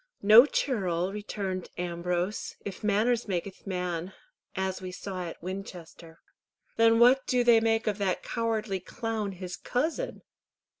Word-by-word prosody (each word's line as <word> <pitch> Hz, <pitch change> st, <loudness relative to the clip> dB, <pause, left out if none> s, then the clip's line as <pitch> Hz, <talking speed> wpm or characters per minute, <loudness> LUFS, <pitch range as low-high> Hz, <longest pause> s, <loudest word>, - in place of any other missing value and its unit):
"No 220 Hz, +6 st, +9 dB
churl," 190 Hz, -, -1 dB
returned 200 Hz, -3 st, -4 dB
Ambrose, 175 Hz, +3 st, -2 dB
"if 200 Hz, 0 st, -7 dB
manners 220 Hz, +3 st, +2 dB
makyth 190 Hz, +1 st, -4 dB
man, 180 Hz, -1 st, -3 dB, 0.4 s
as 190 Hz, 0 st, -2 dB
we 185 Hz, -1 st, -6 dB
saw 185 Hz, -1 st, -5 dB
at 165 Hz, -, -9 dB
Winchester." 175 Hz, -3 st, -8 dB, 0.5 s
"Then 230 Hz, 0 st, +5 dB
what 250 Hz, +3 st, +5 dB
do 250 Hz, -1 st, +2 dB
they 235 Hz, -1 st, +6 dB
make 225 Hz, 0 st, +1 dB
of 210 Hz, -1 st, -1 dB
that 190 Hz, -3 st, -1 dB
cowardly 220 Hz, -4 st, -1 dB
clown, 215 Hz, +2 st, -4 dB
his 180 Hz, 0 st, -6 dB
cousin?" 315 Hz, -, -2 dB
195 Hz, 135 wpm, -28 LUFS, 180-225 Hz, 0.5 s, No